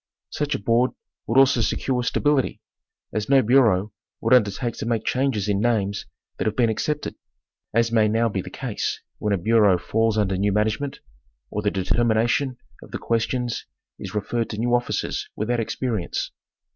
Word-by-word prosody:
Such 150 -1 -1
a - - -3
board 115 +5 +2 0.3
would 115 - +1
also 135 -2 +5
secure 125 +2 0
stability, 140 +2 +1 0.5
as 105 +1 -2
no 135 -1 +6
bureau 105 -5 +3 0.3
would - - +2
undertake 120 0 +2
to 110 - -4
make 115 -2 0
changes 130 -6 0
in 100 -1 +1
names 105 -4 0 0.3
that - - 0
have 110 - 0
been 115 -3 +3
accepted, 150 +7 -2 0.6
as 115 +1 +2
may 110 -2 +4
now 115 +2 +2
be 100 -3 -2
the - - -9
case - - -3 0.2
when 105 - -1
a 100 - +3
bureau 105 0 +4
falls 110 +4 0
under 95 -3 +1
new 100 +2 +1
management, 110 +7 -1 0.5
or 105 - -2
the 105 - +1
determination 115 +6 +1 0.2
of - - -13
the - - -4
questions 115 +1 -1 0.3
is - - -7
re 105 - +1
ferred 115 +3 -2
to 105 - -5
new 120 +2 0
officers 120 0 -1
without 120 +3 -1
experience. 115 -4 -2
115 Hz, 170 wpm, -24 LUFS, 105-125 Hz, 0.6 s, no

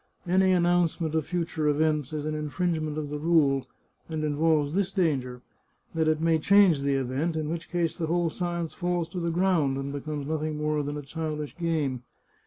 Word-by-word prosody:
Any 190 +1 +4
announcement 175 -2 +2
of 160 -2 0
future 165 -3 -1
events 150 -1 +1
is 150 -1 -3
an 155 - -2
infringe 160 +3 -1
ment 155 -1 -3
of 150 -2 -4
the 150 - -3
rule, 145 -4 +3 0.4
and 160 -1 -3
involves 150 0 +2
this 195 0 0
danger 130 -9 -1 0.2
— - - -39
that 160 -1 +1
it 155 0 +2
may 165 0 +2
change 195 -4 +5
the 140 0 +1
event, 135 +5 -1
in 155 -1 -2
which 170 0 -5
case 175 -2 0
the 165 - -2
whole 170 0 +1
science 170 -2 -3
falls 175 -2 -1
to 180 - -5
the 170 0 -1
ground, 165 -6 +2
and 140 +1 -4
becomes 145 0 -4
nothing 155 0 -2
more 150 0 0
than 145 +1 -4
a 145 - -6
childish 150 0 -4
game. 155 -7 -1
155 Hz, 195 wpm, -27 LUFS, 150-170 Hz, 0.4 s, change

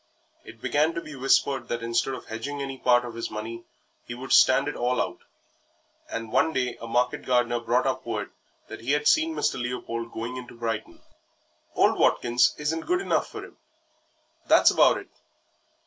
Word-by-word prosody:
It - - -14
began 155 +3 +1
to 170 - -2
be 155 - -10
whispered 135 +1 +1
that 120 0 -3
instead 115 +3 0
of - - -10
hedging 140 +6 -5
any 135 -1 -5
part 120 -1 +3
of 120 - -7
his 115 0 -4
money 115 +2 -6 0.4
he 120 - -7
would 130 +2 -8
stand 135 +2 +5
it 145 - -3
all 125 0 0
out, - - -2 0.9
and 115 -1 -5
one 160 - +2
day 125 -2 -1
a 115 - -6
market 125 +2 0
gardener 120 -1 +1
brought 120 +2 +1
up 130 -1 -1
word 110 -3 -4 0.4
that - - -9
he 130 +5 0
had 150 0 +1
seen 320 +1 +3
Mr. - - 0
Leopold 115 -1 -4
going 120 +3 -5
into 120 -1 -10
Brighton. 115 -2 -4 0.7
"Old - - +3
Watkins 120 +1 +3
isn't 155 +2 -2
good 360 +2 +2
enough 390 - 0
for - - -8
him, - - -17 0.9
that's - - +6
about - - +5
it. - - -10
125 Hz, 180 wpm, -26 LUFS, 115-135 Hz, 0.9 s, that's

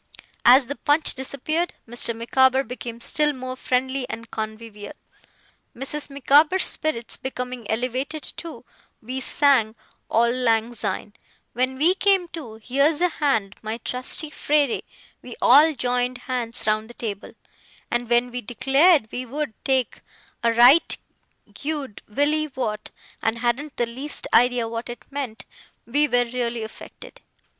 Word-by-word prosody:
As 255 +2 +7
the 285 +4 -6
punch 295 +2 +2
disappeared, 310 +6 -2
Mr. 235 0 +4
Micawber 260 +3 +3
became 240 -2 -7
still 295 +5 +1
more 255 -1 -6
friendly 260 +1 -1
and 230 0 -7
convivial. 215 -1 -6 0.8
Mrs. 275 +4 -2
Micawber's 290 +6 +3
spirits 275 -8 0
becoming 250 -3 -6
elevated, 255 +6 -2
too, 335 -2 -8 0.4
we 255 +4 -4
sang 260 -5 +3 0.3
'Auld 235 +1 +3
Lang 230 -1 +1
Syne'. 210 -2 -3 0.4
When 255 +2 -1
we 325 +6 +5
came 385 -2 +2
to 280 -11 -8
'Here's 275 +7 +1
a 360 0 +3
hand, 225 -12 -1
my 220 +1 -4
trusty 255 +5 -2
frere', 290 -5 +1 0.4
we 245 - -9
all 300 +5 +6
joined 250 0 -1
hands 245 -2 -1
round 215 +1 0
the 240 - -12
table; 210 -3 -6 0.6
and 240 0 -1
when 240 +1 +2
we 250 0 -4
declared 270 - +3
we 255 0 -5
would 290 -1 -4
'take 260 -3 0 0.4
a 235 - +2
right 245 +8 +6 0.6
gude 290 -6 -5
Willie 300 +7 +1
Waught', 240 -6 -4 0.3
and 225 +1 0
hadn't 250 +5 -2
the 240 - +1
least 260 +6 -4
idea 245 -1 +4
what 230 +1 -5
it 240 -1 -9
meant, 270 -6 -5 0.4
we 290 +5 +2
were 245 -3 +2
really 235 -1 -3
affected. 220 - -11
250 Hz, 140 wpm, -23 LUFS, 235-285 Hz, 0.8 s, As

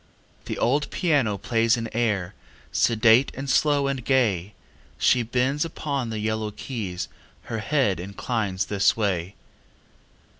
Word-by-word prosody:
The - - -4
old 145 +5 +1
piano 140 - +1
plays 115 +2 +2
an 115 -1 -3
air, 105 -6 0 0.4
Sedate 115 +2 +4
and 135 +1 -5
slow 145 +1 +3
and 135 -3 -2
gay; 105 -8 +1 0.4
She 125 - +3
bends 130 +5 0
upon 140 -6 -3
the 110 - -4
yellow 110 0 -1
keys, 100 -6 -5 0.4
Her 115 -1 -4
head 125 -6 +1
inclines 100 +1 -2
this 100 +1 +2
way. 95 -4 -1
115 Hz, 125 wpm, -25 LUFS, 105-135 Hz, 0.4 s, Sedate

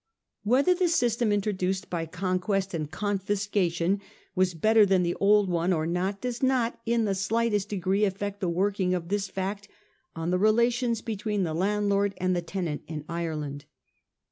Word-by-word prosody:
Whether 260 - +4
the 360 0 +1
system 240 -8 +1
introduced 195 -2 -1
by 165 -2 -3
conquest 185 +2 -1
and 155 -3 -3
confiscation 200 -2 0 0.3
was 185 -2 +1
better 220 +6 +5
than 190 -2 +3
the 175 0 0
old 205 0 +4
one 175 0 0
or 160 -3 +1
not 185 +4 -1
does 245 -1 -3
not 255 -3 +1
in 230 -1 +2
the 200 - +1
slightest 210 +1 0
degree 195 +1 0
affect 200 0 -2
the 180 - -1
working 185 +1 +1
of 170 -1 -5
this 200 0 0
fact 195 +2 -4 0.5
on 165 +1 -2
the 180 - +2
relations 235 +2 +2
between 210 -3 -2
the 160 -3 -2
landlord 200 +2 +1
and 185 0 0
the 175 - 0
tenant 170 -3 -3
in 150 -2 -6
Ireland. 155 -4 -4
195 Hz, 165 wpm, -27 LUFS, 180-210 Hz, 0.5 s, better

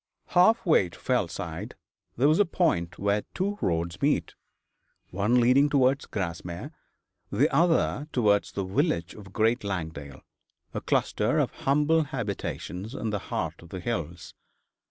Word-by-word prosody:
Half 185 +6 +4
way 155 - +4
to - - -14
Fellside - - -2 0.4
there 130 +4 +4
was 155 +4 +4
a - - +7
point 115 - 0
where 100 +1 +1
two 200 +2 -1
roads 85 +1 -1
met, 140 - +1 0.8
one 105 +7 +2
leading 130 +4 +4
towards 135 0 +2
Grasmere, 85 -2 -5 0.6
the 125 +9 +3
other 165 -3 +2
towards 105 -5 +2
the 100 - -2
village 95 - 0
of 100 -3 -12
Great 115 +4 +1
Langdale, 80 -8 -5 0.5
a - - -3
cluster - - +1
of - - +1
humble 150 +3 +2
habitations 110 -4 -5
in 110 -4 -3
the 105 - -1
heart - - -3
of 85 - -14
the 95 - -6
hills. 85 -4 -4
110 Hz, 140 wpm, -27 LUFS, 90-145 Hz, 0.8 s, a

